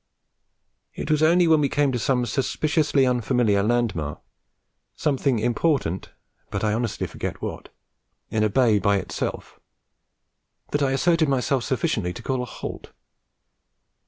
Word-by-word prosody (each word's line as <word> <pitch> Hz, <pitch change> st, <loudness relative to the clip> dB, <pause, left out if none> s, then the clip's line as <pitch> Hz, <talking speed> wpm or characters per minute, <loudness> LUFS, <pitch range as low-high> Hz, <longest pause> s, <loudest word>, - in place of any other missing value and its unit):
It 155 Hz, -, -3 dB
was 155 Hz, 0 st, +2 dB
only 170 Hz, +2 st, +5 dB
when 160 Hz, -2 st, +5 dB
we 140 Hz, -, +1 dB
came 145 Hz, -2 st, +2 dB
to 125 Hz, -, -2 dB
some 125 Hz, +1 st, +1 dB
suspiciously 140 Hz, +4 st, +1 dB
unfamiliar 120 Hz, -4 st, +2 dB
landmark, 105 Hz, -10 st, -1 dB, 0.8 s
something 135 Hz, -3 st, +1 dB
important 120 Hz, -, 0 dB, 0.4 s
(but -, -, -3 dB
I 105 Hz, -1 st, +2 dB
honestly 115 Hz, -1 st, -2 dB
forget -, -, -5 dB
what) -, -, -6 dB, 0.6 s
in 110 Hz, -, +1 dB
a 110 Hz, -, +2 dB
bay 110 Hz, -2 st, +3 dB
by 100 Hz, 0 st, +2 dB
itself, 95 Hz, -, -5 dB, 1.1 s
that 145 Hz, -, 0 dB
I 135 Hz, -1 st, +2 dB
asserted 165 Hz, +2 st, +2 dB
myself 135 Hz, -1 st, +1 dB
sufficiently 105 Hz, -8 st, -1 dB
to 120 Hz, -, -10 dB
call 130 Hz, 0 st, -1 dB
a -, -, -3 dB
halt. -, -, -8 dB
125 Hz, 135 wpm, -24 LUFS, 110-145 Hz, 1.1 s, only